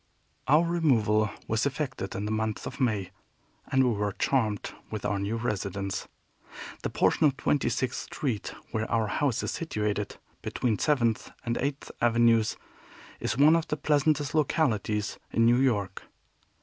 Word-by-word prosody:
Our 150 +4 +5
removal 115 -11 +2 0.2
was 110 +5 +1
effected 130 -7 -4
in 100 - -3
the 105 - -2
month 110 0 -2
of - - -7
May, 105 -7 0 0.6
and 130 0 +4
we 125 - +3
were 105 -1 -1
charmed 110 -7 0 0.2
with 110 - -5
our 100 -1 0
new 100 +3 -1
residence. 100 -3 -3 0.7
The - - -2
portion 155 - +3
of 135 -2 -1
Twenty 145 - +1
sixth 130 - -2
Street 125 -8 -3 0.2
where 110 -1 -2
our 115 -1 +2
house 125 +3 0
is - - -1
situated, 105 -9 -2 0.2
between 115 -4 -1
Seventh 120 -7 +1 0.2
and 120 0 0
Eighth 140 +1 -3
Avenues, 115 -1 +3 0.6
is 120 - -2
one 150 +4 +7
of 165 -1 0
the 150 - -2
pleasantest 145 -1 +1
localities 110 -9 0
in 115 - +3
New 120 +1 +5
York. 110 -8 0
115 Hz, 150 wpm, -28 LUFS, 105-140 Hz, 0.7 s, one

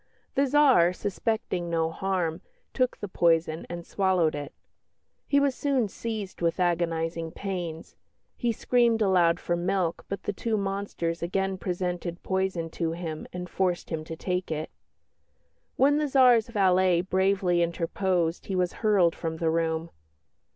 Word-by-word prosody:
"The 275 +1 +2
Tsar, 260 -11 +5
suspecting 200 -3 -2
no 165 -1 0
harm, 180 -2 -2 0.3
took 255 -1 0
the 205 - -5
poison 165 -3 +1
and 170 -1 -6
swallowed 185 -5 +1
it. 145 -1 -5 0.8
He 280 - +4
was 280 -1 +2
soon 265 -4 0
seized 215 -4 -5
with 170 +1 0
agonising 165 -2 0
pains. 175 -5 -5 0.4
He 240 - 0
screamed 235 -1 +2
aloud 180 -3 +3
for 175 - -1
milk, 175 -1 -1
but 200 -1 -4
the 205 - -2
two 220 +2 -1
monsters 195 -4 -3
again 190 +2 -1
presented 180 -1 -3
poison 190 -3 -1
to 165 -1 -2
him 165 -2 -5
and 180 0 -5
forced 180 -1 -1
him 160 -1 -2
to 160 - -6
take 180 +2 -2
it. 155 -1 -3 1.0
When 290 +3 +4
the 300 - 0
Tsar's 250 -5 +5
valet 185 -5 +3
bravely 190 -1 +1
interposed 170 0 -1
he 195 - -2
was 180 -1 0
hurled 200 -6 +3
from 160 -1 -4
the 160 -1 +1
room. 165 0 -1
180 Hz, 145 wpm, -27 LUFS, 170-200 Hz, 1.0 s, Tsar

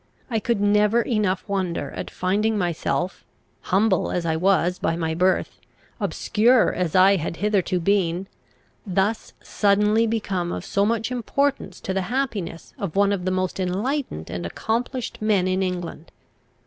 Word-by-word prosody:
I 225 - +1
could 230 0 0
never 210 +3 +3
enough 210 -6 0
wonder 190 -4 -2
at - - -6
finding 210 +4 0
myself, 175 0 -1 0.4
humble 195 +1 +2
as 175 -1 -2
I 160 -1 +1
was 180 0 +2
by 165 - 0
my 160 -1 -1
birth, 185 +3 +1 0.4
obscure 230 +3 +3
as 180 -2 -2
I 190 +1 +6
had 165 0 -3
hitherto 200 -2 +1
been, 185 -1 +1 0.6
thus 200 +2 -1
suddenly 210 +2 +2
become 195 -6 -1
of - - -5
so 200 +1 +1
much 225 +1 -1
importance 275 +3 -1
to 190 - -3
the 190 - 0
happiness 225 -10 -3
of 195 -7 -4
one 200 0 +4
of 185 -3 -3
the - - +1
most 185 0 -1
enlightened 190 - -2
and 90 0 -4
accomplished 230 - -3
men 205 -4 +2
in 185 +1 0
England. 180 -3 -4
195 Hz, 150 wpm, -23 LUFS, 180-220 Hz, 0.6 s, I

